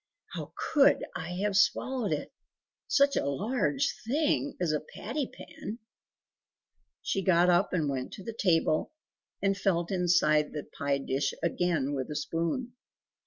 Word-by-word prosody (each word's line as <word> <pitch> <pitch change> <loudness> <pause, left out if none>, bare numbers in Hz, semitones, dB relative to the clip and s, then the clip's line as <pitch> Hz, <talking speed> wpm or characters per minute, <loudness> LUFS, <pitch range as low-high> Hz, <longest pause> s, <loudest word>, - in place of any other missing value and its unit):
"How - - -6 0.2
COULD 285 -3 +5
I 175 - -4
have 205 -1 0
swallowed 240 +3 +2
it! - - -3 0.5
such 280 0 +4
a - - 0
large 260 - 0
thing 290 +1 +1
as 175 -3 +1
a 150 - +1
patty 235 - -4
pan!" 310 -9 -8 1.3
She 195 - 0
got 180 -1 +4
up 175 +3 +3
and 165 -5 0
went 130 -2 -3
to 195 - -8
the 230 - -5
table, 165 - +1 0.5
and 195 0 +3
felt 180 -3 0
inside 175 -5 +3
the 150 - -4
pie 140 -1 -2
dish 135 0 -1
again 170 -5 0
with 130 -2 -3
a 150 - -4
spoon. 165 - -2
180 Hz, 145 wpm, -29 LUFS, 155-230 Hz, 1.3 s, COULD